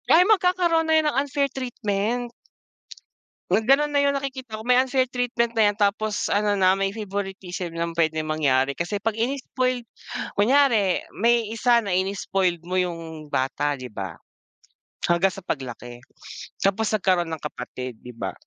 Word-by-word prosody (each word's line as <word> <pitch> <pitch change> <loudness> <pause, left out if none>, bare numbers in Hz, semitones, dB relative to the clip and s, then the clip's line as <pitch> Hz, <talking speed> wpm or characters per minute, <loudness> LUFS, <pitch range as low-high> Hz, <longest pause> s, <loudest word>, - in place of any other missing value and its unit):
Ay 355 +3 +7
magkakaroon 360 -5 +3
na - - +4
yan 315 - +2
ng - - -3
unfair 280 0 0
treatment. 240 -1 -2 1.2
Ganun 265 +10 +3
na 285 - +2
yung 280 0 +3
nakikita 260 -5 -5
ko, - - -10
may 250 +1 +4
unfair 260 0 +2
treatment 245 -1 0
na 210 -2 +5
yan - - -13
tapos 210 0 0
ano 205 0 +2
na, 190 -1 +4
may 195 0 -1
favoritism 190 -4 -5
ng 170 0 -3
pwedeng 160 -1 +1
mangyari 140 -3 +2
kasi 200 +4 -2
'pag 220 +1 -1
ini-spoiled 255 0 -1 0.5
kunyari 220 -4 +3
may 235 +2 +2
isa 235 +1 +3
na 200 - -2
ini-spoiled 185 -2 0
mo 180 - -4
yung 165 -3 -5
bata 145 +2 0
di 130 - -7
ba, 95 -5 -6 0.9
hanggang 175 +3 +3
sa 190 0 -11
paglaki, 120 -3 -5 0.6
tapos 200 +3 +1
nagkaroon 185 -4 +1
ng 160 - -5
kapatid, 125 -4 -6
di 125 - -11
ba? - - -3
205 Hz, 155 wpm, -24 LUFS, 170-250 Hz, 1.2 s, Ay